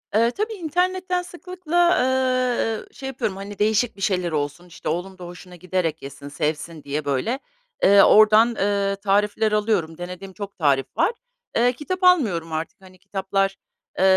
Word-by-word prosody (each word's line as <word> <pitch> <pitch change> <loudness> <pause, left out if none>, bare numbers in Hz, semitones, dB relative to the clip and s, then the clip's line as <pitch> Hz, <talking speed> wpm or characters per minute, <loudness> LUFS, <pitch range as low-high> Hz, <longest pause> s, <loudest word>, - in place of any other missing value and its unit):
Eee, 230 +2 +4
tabii 430 - -3
internetten 365 +1 -1
sıklıkla, 350 -1 0
eee, 255 -3 +1
şey 270 - -7
yapıyorum, 220 -7 -3
hani, 200 +1 -8
değişik 220 +2 +2
bir 195 - -13
şeyler 180 -4 0
olsun, 150 +4 -3
işte, 165 -3 -6
oğlum 180 +4 -3
da 180 - -9
hoşuna 180 +1 -11
giderek 175 -2 -2
yesin, 140 +1 -9
sevsin 150 +2 -3
diye, 145 +1 -3
böyle, 145 - -1 0.4
eee, 200 0 +7
oradan, 215 +2 +6
eee, 200 0 0
tarifler 205 +2 +1
alıyorum. 205 -7 0
Denediğim 180 +2 -8
çok 200 +1 -8
tarif 140 -5 +2
var. 345 +7 +3 0.4
Eee, 245 +2 +3
kitap 365 +8 -5
almıyorum 215 - +3
artık. 160 +4 -5
Hani, 185 -1 -16
kitaplar, 195 0 -1 0.4
eee, - - +3
200 Hz, 155 wpm, -23 LUFS, 175-255 Hz, 0.4 s, eee